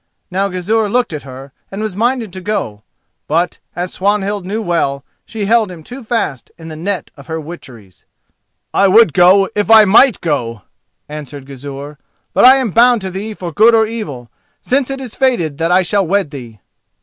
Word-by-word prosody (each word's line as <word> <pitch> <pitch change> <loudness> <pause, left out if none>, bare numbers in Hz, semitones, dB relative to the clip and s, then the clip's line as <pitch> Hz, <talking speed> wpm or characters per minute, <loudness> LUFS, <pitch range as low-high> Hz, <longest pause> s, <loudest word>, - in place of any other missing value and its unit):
Now 195 +2 0
Gizur 205 +4 -1
looked 245 -4 0
at 150 - -5
her, 135 +2 -10 0.2
and 195 - -7
was 215 -4 -4
minded 230 -2 -1
to 185 - -7
go; 180 - -3 0.5
but, 170 +3 0 0.2
as 175 +1 -4
Swanhild 200 -1 -1
knew 210 +3 -2
well, 165 -8 -1 0.2
she 220 -3 -4
held 220 -2 +2
him 165 -3 -11
too 250 - -10
fast 220 - -2
in 165 -1 -10
the 155 - -7
net 185 +5 -4
of 140 -1 -15
her 160 0 -4
witcheries. 130 - -12 0.7
"I 200 - +4
would 205 -4 +5
go, 190 +2 +5
if 205 0 -1
I 220 -1 +8
might 225 +3 +5
go!" 120 - -3 0.4
answered 145 -2 -8
Gizur; 140 +1 -9 0.3
"but - - +3
I 260 +1 +9
am 260 -6 -1
bound 240 +2 +4
to 190 -1 -5
thee 210 +4 -6
for 175 -4 -7
good 225 +5 +5
or 220 0 +4
evil, 175 - -7 0.3
since 270 0 0
it 270 0 -4
is 255 -4 -7
fated 175 - 0
that 165 +1 0
I 185 +1 +4
shall 195 +1 0
wed 195 -4 0
thee." 120 -8 -10
185 Hz, 190 wpm, -15 LUFS, 150-220 Hz, 0.7 s, I